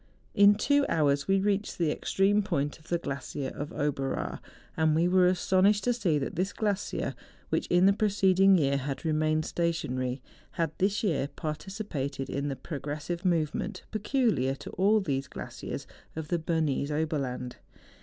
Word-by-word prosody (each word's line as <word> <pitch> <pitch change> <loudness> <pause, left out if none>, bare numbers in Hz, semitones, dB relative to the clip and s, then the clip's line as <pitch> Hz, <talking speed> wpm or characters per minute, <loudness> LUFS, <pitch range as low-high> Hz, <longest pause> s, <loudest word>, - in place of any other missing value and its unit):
In 205 0 +7
two 285 +7 +3
hours 140 -3 +2
we 195 0 +3
reached 200 +1 0
the 165 -3 +1
extreme 200 +6 +2
point 155 -8 -2
of 155 - -21
the 175 - +1
glacier 135 -3 -4
of 145 +1 -6
Oberaar; 140 -3 -2 0.4
and 160 -1 +2
we 165 +2 +3
were 180 0 +5
astonished 190 +3 +3
to 245 - +2
see 185 -10 +1
that 140 - -3
this 190 +3 -1
glacier 205 -2 -1 0.4
which - - 0
in 175 +1 +4
the 200 - +6
preceding 195 -2 +4
year, 140 -3 +2
had 140 +3 -4
remained 155 0 +1
stationary, 130 -7 -1 0.3
had 165 -3 -1
this 200 +3 +1
year 155 -9 +1
participated 150 -2 -4
in 140 +1 -2
the 140 - -2
progressive 150 +5 -5
movement 175 +2 -1
peculiar 210 - +1
to - - -9
all 205 +4 +3
these 135 -7 -2
glaciers - - -7 0.3
of 155 -1 -5
the 175 - +1
Bernese 155 -3 0
Oberland. 140 -5 -2
165 Hz, 155 wpm, -29 LUFS, 145-195 Hz, 0.4 s, In